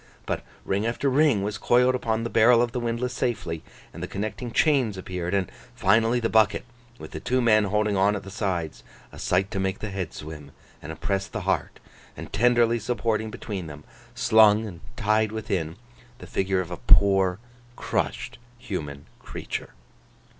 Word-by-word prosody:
But, -, -, -2 dB, 0.2 s
ring 100 Hz, +3 st, 0 dB
after 130 Hz, +4 st, 0 dB
ring 135 Hz, -7 st, +3 dB
was 105 Hz, +2 st, -3 dB
coiled 125 Hz, +1 st, +4 dB
upon 115 Hz, -3 st, -1 dB
the 115 Hz, -, -2 dB
barrel 115 Hz, +1 st, +6 dB
of 120 Hz, -, -2 dB
the 125 Hz, -, -2 dB
windlass 120 Hz, +1 st, -2 dB
safely, 90 Hz, -10 st, -2 dB, 0.3 s
and -, -, -9 dB
the -, -, -3 dB
connecting 110 Hz, +4 st, -4 dB
chains 130 Hz, -8 st, +2 dB
appeared, 90 Hz, 0 st, -3 dB
and 95 Hz, -2 st, -1 dB, 0.2 s
finally 115 Hz, +2 st, +3 dB
the 115 Hz, -, 0 dB
bucket 110 Hz, 0 st, +3 dB, 0.3 s
with -, -, -10 dB
the -, -, -5 dB
two 130 Hz, +1 st, 0 dB
men 110 Hz, -3 st, +4 dB
holding 105 Hz, +1 st, +1 dB
on 100 Hz, +2 st, +3 dB
at 100 Hz, -, -5 dB
the 95 Hz, -, -9 dB
sides—a 90 Hz, -6 st, -5 dB
sight 95 Hz, +1 st, +1 dB
to 95 Hz, -, -2 dB
make 95 Hz, 0 st, -1 dB
the 105 Hz, -, -5 dB
head 95 Hz, -4 st, -4 dB
swim, 75 Hz, -2 st, -9 dB, 0.3 s
and 75 Hz, -, -7 dB
oppress 95 Hz, +4 st, -2 dB
the -, -, -5 dB
heart—and -, -, -5 dB
tenderly 120 Hz, -1 st, +3 dB
supporting 110 Hz, -1 st, -1 dB
between 100 Hz, -5 st, -6 dB
them, 75 Hz, -1 st, -10 dB, 0.3 s
slung 110 Hz, -3 st, +5 dB
and 90 Hz, -6 st, -8 dB, 0.2 s
tied 110 Hz, 0 st, +2 dB
within, 90 Hz, -7 st, -3 dB, 0.4 s
the -, -, -11 dB
figure 95 Hz, -1 st, 0 dB
of 90 Hz, -1 st, -7 dB
a 90 Hz, -, -4 dB
poor, 95 Hz, -1 st, +4 dB, 0.4 s
crushed, -, -, -3 dB, 0.2 s
human 75 Hz, -, -6 dB
creature. -, -, -6 dB
105 Hz, 170 wpm, -25 LUFS, 95-115 Hz, 0.4 s, barrel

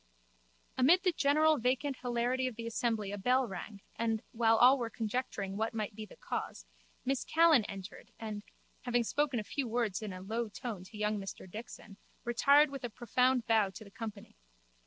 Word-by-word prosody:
Amid 335 Hz, +9 st, +5 dB
the 365 Hz, -, +3 dB
general 305 Hz, 0 st, +3 dB
vacant 255 Hz, +3 st, 0 dB
hilarity 245 Hz, +1 st, 0 dB
of 250 Hz, -, -5 dB
the 230 Hz, 0 st, -6 dB
assembly 225 Hz, -3 st, -1 dB
a 205 Hz, -, -4 dB
bell 255 Hz, +4 st, +2 dB
rang 200 Hz, +1 st, -7 dB
and, 225 Hz, -1 st, -1 dB
while 225 Hz, -1 st, +3 dB
all 260 Hz, +3 st, +7 dB
were 235 Hz, -2 st, -2 dB
conjecturing 215 Hz, -3 st, -3 dB
what 225 Hz, +1 st, -1 dB
might 215 Hz, -1 st, -2 dB
be 215 Hz, +1 st, -8 dB
the -, -, -14 dB
cause, -, -, -5 dB, 0.4 s
Miss 270 Hz, 0 st, 0 dB
Callan 320 Hz, -8 st, +5 dB
entered 195 Hz, 0 st, -9 dB
and, 215 Hz, -2 st, -5 dB, 0.4 s
having 245 Hz, -2 st, +1 dB
spoken 280 Hz, +1 st, 0 dB
a -, -, -3 dB
few 270 Hz, +4 st, -3 dB
words 225 Hz, -4 st, -1 dB
in 215 Hz, -2 st, -4 dB
a 185 Hz, -, -7 dB
low 225 Hz, +4 st, -2 dB
tone 210 Hz, -2 st, -6 dB
to 210 Hz, +3 st, -12 dB
young 210 Hz, 0 st, 0 dB
Mr 195 Hz, -1 st, -7 dB
Dixon, 210 Hz, 0 st, -9 dB, 0.3 s
retired 280 Hz, +5 st, +5 dB
with 275 Hz, -2 st, -7 dB
a 245 Hz, -, -2 dB
profound 250 Hz, +2 st, +1 dB
bow 220 Hz, -4 st, +3 dB
to 205 Hz, +3 st, -10 dB
the 200 Hz, -, -15 dB
company. 215 Hz, -2 st, -8 dB
230 Hz, 185 wpm, -32 LUFS, 210-255 Hz, 0.4 s, all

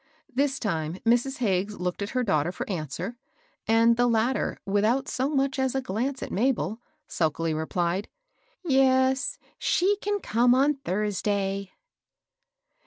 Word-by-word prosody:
This 275 Hz, +1 st, +1 dB
time 165 Hz, -, -2 dB
Mrs. 245 Hz, +4 st, +2 dB
Hagges 205 Hz, -2 st, -1 dB
looked 180 Hz, +2 st, -3 dB
at 200 Hz, -, -2 dB
her 250 Hz, -, +2 dB
daughter 160 Hz, -6 st, +1 dB
for -, -, -6 dB
answer; 175 Hz, -, -4 dB, 0.5 s
and 230 Hz, +1 st, +4 dB
the 245 Hz, 0 st, +3 dB
latter, 235 Hz, +3 st, 0 dB
without 215 Hz, +7 st, +1 dB
so 260 Hz, +2 st, -1 dB
much 275 Hz, -2 st, 0 dB
as 265 Hz, 0 st, 0 dB
a -, -, +2 dB
.glance 255 Hz, +4 st, -2 dB
at -, -, -6 dB
Mabel, 230 Hz, 0 st, 0 dB, 0.2 s
sulkily 160 Hz, 0 st, -1 dB
replied, 170 Hz, +4 st, -1 dB, 0.2 s
— -, -, -42 dB
" -, -, -55 dB
Yes, 265 Hz, -2 st, +3 dB, 0.2 s
she 400 Hz, +3 st, +2 dB
can 410 Hz, 0 st, -1 dB
come 245 Hz, -, +3 dB
on 280 Hz, +3 st, +4 dB
Thursday." 200 Hz, -3 st, -1 dB
230 Hz, 145 wpm, -26 LUFS, 195-265 Hz, 0.5 s, and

